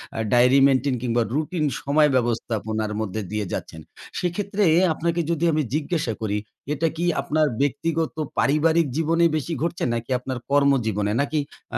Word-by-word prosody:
আ - - -5 0.2
dairy 125 +3 +5
maintain 135 0 +1
কিংবা 120 -1 +1
routine 155 +2 -1 0.2
সময় 150 +2 +3
ব্যবস্থাপনার 110 -3 -1
মধ্যে 110 0 -3
দিয়ে 105 -1 -2
যাচ্ছেন। 80 - -6 0.4
সেক্ষেত্রে, 200 +3 -1 0.3
আপনাকে 170 +2 -1
যদি 165 0 -1
আমি 155 - +2
জিজ্ঞাসা 155 -6 -1
করি, 105 -1 -1 0.4
এটা 155 +3 0
কি 170 - -1 0.2
আপনার 155 0 +1
ব্যক্তিগত 160 +4 -1 0.2
পারিবারিক 160 +3 +3
জীবনে 165 +1 +2
বেশি 155 +2 -2
ঘটছে? 170 +1 -2
নাকি 115 +1 -4
আপনার 130 0 -5
কর্মজীবনে? 120 -8 +2
নাকি 145 +2 -1 0.4
আ - - +1
145 Hz, 150 wpm, -23 LUFS, 120-165 Hz, 0.4 s, dairy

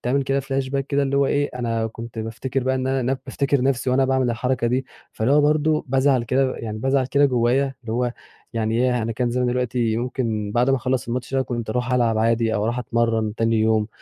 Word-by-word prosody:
بتعمل 135 +3 0
كده 135 +1 0
flashback 135 0 -2
كده 140 0 +1
اللي 140 0 0
هو 140 - +3
إيه 145 +1 0
أنا 115 -2 -1
كنت 115 +1 -8
بافتكِر 120 +4 -3
بقى 130 0 +1
إن 130 0 -1
أنا 135 0 0
نب 135 - -2
بافتكِر 140 -2 0
نفسي 130 -1 +1
وأنا 135 +1 +3
باعمل 130 -2 +1
الحركة 120 +1 -1
دي، 130 +2 0 0.3
فاللي 115 +5 0
هو 150 - +6
برضه 155 +1 +2
بازعل 130 -1 +3
كده، 130 +2 +1
يعني 110 -1 -5
بازعل 135 +1 +1
كده 145 +1 +3
جوّايا 130 +2 +1
اللي 110 -2 -5
هو 125 0 0 0.4
يعني 115 -1 -1
ياه! 125 -1 +1
أنا 115 +1 -2
كان 120 +1 -1
زماني 125 0 0
دلوقتي 120 -2 0
ممكن 115 -4 -2
بعد 125 +3 +3
ما 135 - +3
اخلّص 130 -1 -1
الماتش 125 +2 -3
ده 135 - +2
كنت 120 -3 -4
أروح 125 +2 -1
ألعب 115 -3 +2
عادي، 115 0 +2
أو 105 - 0
أروح 120 +2 -1
أتمرّن 115 -2 0
تاني 115 -1 +1
يوم، 110 -1 +2
125 Hz, 225 wpm, -22 LUFS, 115-135 Hz, 0.4 s, هو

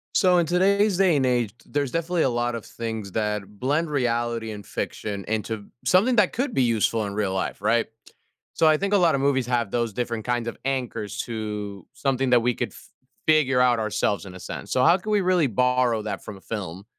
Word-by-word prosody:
So, 180 -3 +5
in 170 - +2
today's 195 +3 +3
day 185 -4 +4
and 135 -2 +2
age, 120 -5 +1
there's 140 -3 -2
definitely 165 0 0
a - - +2
lot 120 0 -1
of 115 - -6
things 110 -4 -5
that 105 -1 -1
blend 150 +5 0
reality 120 -4 -1
and 105 -2 -8
fiction 100 -2 -4
into 110 -1 -3 0.2
something 190 - +4
that 210 -5 +3
could 255 +1 -1
be 130 - +2
useful 115 -1 +1
in 100 - -5
real 100 -2 -1
life. 95 0 -3
Right? 115 +2 +2 0.7
So, 160 - +3
I 155 -1 +5
think 200 +4 -1
a - - +6
lotta 170 -7 +3
movies 135 -3 +1
have 120 -3 0
those 120 -3 -1
different 115 -1 -3
kinds 120 -1 -1
of 115 - -5
anchors 125 -6 -3
to 105 -4 -5
something 135 -2 0
that 125 - +6
we 120 0 +1
could - - -3
f - - -15 0.4
figure 150 -5 +4
out 125 -1 +4
ourselves 105 -2 -1
in 95 -1 -10
a - - -9
sense. - - -7
So 125 - +3
how 170 +2 +7
can 215 +3 -5
we 210 - +4
really 180 -5 +2
borrow 125 0 +2
that 105 - -5
from 105 - -8
a - - -17
film? 95 -4 -6
120 Hz, 215 wpm, -24 LUFS, 110-155 Hz, 0.7 s, how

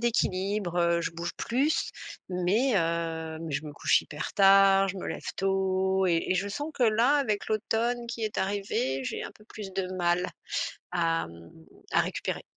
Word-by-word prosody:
d'équilibre, 195 -5 0
heu, 170 0 +3
je - - -2
bouge 170 +1 -4
plus, 275 +6 0 0.4
mais, 190 +9 +2
heu, 165 -2 -1
mais 165 -2 -5
je 145 +3 -2
me 150 - -7
couche - - +3
hyper 150 - -6
tard, 195 -1 +6
je 195 - -4
me - - -5
lève - - -5
tôt 190 0 +1
et 170 -2 +2
et - - +4
je 195 +2 -1
sens 290 +9 -4
que 255 - -1
là, 230 +6 +4
avec 215 -8 0
l'automne 230 +2 0
qui 235 -1 -5
est 215 - -3
arrivé, 190 -9 -1
j'ai - - -3
un - - -7
peu 210 - -20
plus 205 -4 -8
de 190 -1 -1
mal 175 0 +1 0.7
à, 165 -2 +1
mmh, 85 0 -13 0.4
à - - +5
récupérer. - - -3
190 Hz, 180 wpm, -28 LUFS, 170-215 Hz, 0.7 s, tard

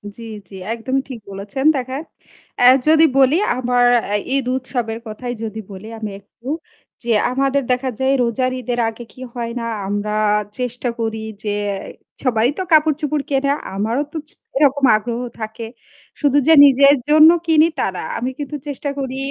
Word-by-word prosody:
জি, - - -12 0.3
জি 195 - -11 0.2
একদমই 260 +4 -1
ঠিক 250 -3 -7
বলেছেন, 200 +7 -5
দেখেন 260 0 -3 0.6
অ্যা 245 - +6 0.2
যদি 315 +1 +6
বলি, 270 +2 +5 0.2
আমার 245 -1 +2 0.2
অ্যা 205 - -2 0.2
ঈদ 275 -2 0
উৎসবের 240 -3 -4
কথাই 245 +3 -5
যদি 220 0 -5
বলি 195 +2 -9
আমি 215 -2 -4
একটু 220 +5 -18 0.6
যে, 235 - -1 0.2
"আমাদের 275 +2 +1
দেখা 250 +1 0
যায় 265 +1 +2
রোজার 255 +2 0
ঈদের 245 0 -3
আগে 225 +2 -9
কি 255 - -14
হয় 235 -1 -4
না 230 - -4 0.2
আমরা 205 +1 -2 0.4
চেষ্টা 245 0 -3
করি 220 -1 -2 0.2
যে 205 -1 -1 0.2
অ্যা 195 - -2 0.5
সবাই 235 -3 +2
তো 375 - -2
কাপড়-চোপড় 305 -1 +2
কেনে 275 0 +1 0.2
আমারও 225 +8 0
তো 325 - -4
ছ - - -5 0.3
এরকম 285 -1 +3
আগ্রহ 235 +2 -4 0.2
থাকে।" 220 +1 -6 0.5
শুধু 285 -1 +3
যে 325 - +7
নিজের 275 +1 +6
জন্য 310 +1 +8 0.2
কিনি 315 0 +5
তা - - +1
না, - - -4
আমি 250 - -2
কিন্তু 290 +1 -5
চেষ্টা 285 0 -4
করি 265 -1 -4
250 Hz, 170 wpm, -19 LUFS, 225-275 Hz, 0.6 s, জন্য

